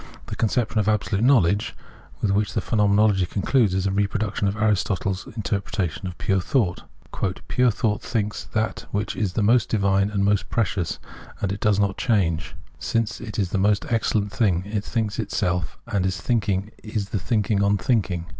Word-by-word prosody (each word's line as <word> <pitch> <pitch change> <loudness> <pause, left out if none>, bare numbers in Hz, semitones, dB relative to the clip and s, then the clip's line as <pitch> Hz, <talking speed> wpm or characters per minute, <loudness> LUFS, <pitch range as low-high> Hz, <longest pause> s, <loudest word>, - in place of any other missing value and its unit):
* - - -20
The - - -2
conception 115 0 0
of 105 0 +2
"Absolute 105 0 0
Knowledge" 105 -7 +3 0.5
with 105 - +1
wliich 105 +1 +1
the - - +3
Phenomenology 105 -3 +3
concludes 105 +1 +2
is 95 0 0
a 95 - +1
reproduction 100 +1 0
of 100 - -1
Aris 105 -3 +2
totle's 95 -1 -2
interpretation 100 -4 -2
of 90 - -7
pure 95 -3 +1
thought. 105 -7 0 0.3
" 95 -1 -3
Pure 125 0 +3
thought 105 -1 0
thinks 105 -2 -2
that 110 0 -2
which 105 +1 -2
is 100 -4 -1
the 110 - 0
most 115 +2 +3
divine 100 -2 +2
and 100 -2 0
most 100 -1 +1
precious, 100 -6 -1 0.4
and 100 - -1
it 100 - -4
does 105 -1 +2
not 100 -1 +1
change.... 85 -8 0 0.2
Since 115 -1 -1
it 110 -3 -6
is 95 -4 0
the 95 - 0
most 100 +1 +2
excellent 110 -3 +1
thing, 95 -8 +1
it 105 0 -2
thinli;s 110 -3 -2
itself, 90 -7 -1
and 100 -3 -1
its 95 0 -1
thinking 105 -4 0
is 105 -2 -4
the 105 - -1
thinking 105 +1 +1
on 100 0 +3
thitiking. 95 -5 0
100 Hz, 185 wpm, -24 LUFS, 95-110 Hz, 0.5 s, Knowledge